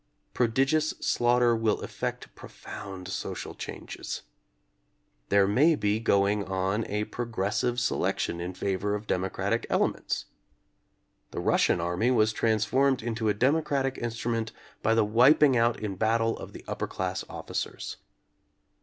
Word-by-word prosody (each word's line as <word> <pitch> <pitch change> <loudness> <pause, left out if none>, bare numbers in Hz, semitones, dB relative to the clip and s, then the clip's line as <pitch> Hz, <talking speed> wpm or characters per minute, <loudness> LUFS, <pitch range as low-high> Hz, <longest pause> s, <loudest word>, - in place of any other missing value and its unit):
Prodigious 135 +6 +2
slaughter 120 0 +3
will 110 -2 +1
effect - - -5
profound 95 -2 -9
social 95 - -5
changes. - - -7 1.1
There 100 -1 +4
may 145 +11 +4
be 105 -4 0
go 100 -3 +3
ing 105 0 0
on 95 +3 -1
a 105 +1 -1
progressive 120 +1 -1
selection 85 -7 -1
in 90 +1 -5
favor 100 +2 -1
of 105 +1 -6
demo 95 -1 0
cratic - - -1
elements. - - 0 1.0
The - - -5
Russian - - +2
army 90 +7 0
was 110 -3 +3
trans 110 -1 +1
formed 135 +1 +2
into 115 -2 -1
a 105 - +1
democratic 135 +1 +1
instrument 115 -1 -2 0.3
by 110 - +2
the 115 -2 +4
wip 120 +9 +5
ing 135 -3 +5
out 115 0 +2
in 100 -3 -4
battle 115 +2 +2
of - - -9
the - - -11
upper - - -3
class - - -3
officers. - - -5
110 Hz, 140 wpm, -28 LUFS, 100-120 Hz, 1.1 s, wip